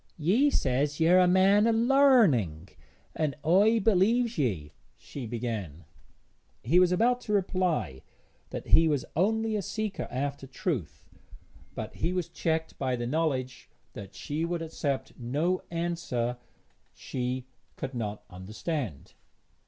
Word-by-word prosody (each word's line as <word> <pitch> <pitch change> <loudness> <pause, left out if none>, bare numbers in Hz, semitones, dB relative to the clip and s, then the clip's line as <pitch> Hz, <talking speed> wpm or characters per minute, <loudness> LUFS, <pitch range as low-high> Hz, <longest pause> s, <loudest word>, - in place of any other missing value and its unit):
'Ye 205 - +3
says 140 - 0
yer 170 +3 +5
a 180 - +5
man 195 +4 +4
o' - - +4
larning, 225 - +4 0.5
an' 150 -3 -1
I 200 +7 +5
b'lieves 225 +4 +3
ye, 95 - -1 0.3
she 130 -5 -8
began. 110 -9 -5 0.8
He 175 - +4
was 180 -1 +4
about 245 +7 +2
to 210 - -3
reply 180 - 0 0.5
that - - -7
he 165 - +6
was 145 -4 0
only 220 +5 +1
a 210 - 0
seeker 215 +2 -4
after 135 +1 -4
truth, 130 - -4 0.7
but - - -5
he 170 +3 -1
was 180 -2 -2
checked 160 -1 -2
by 130 -2 0
the 120 -1 -4
knowledge 130 -2 -2 0.2
that 100 -1 -10
she 150 +3 -3
would 170 0 -2
accept 145 -4 -3
no 150 +10 -1
answer 165 -8 -2 0.6
she 125 0 -4 0.3
could 130 - -5
not 105 -3 -4
understand. 105 - -5
160 Hz, 130 wpm, -28 LUFS, 125-185 Hz, 0.8 s, he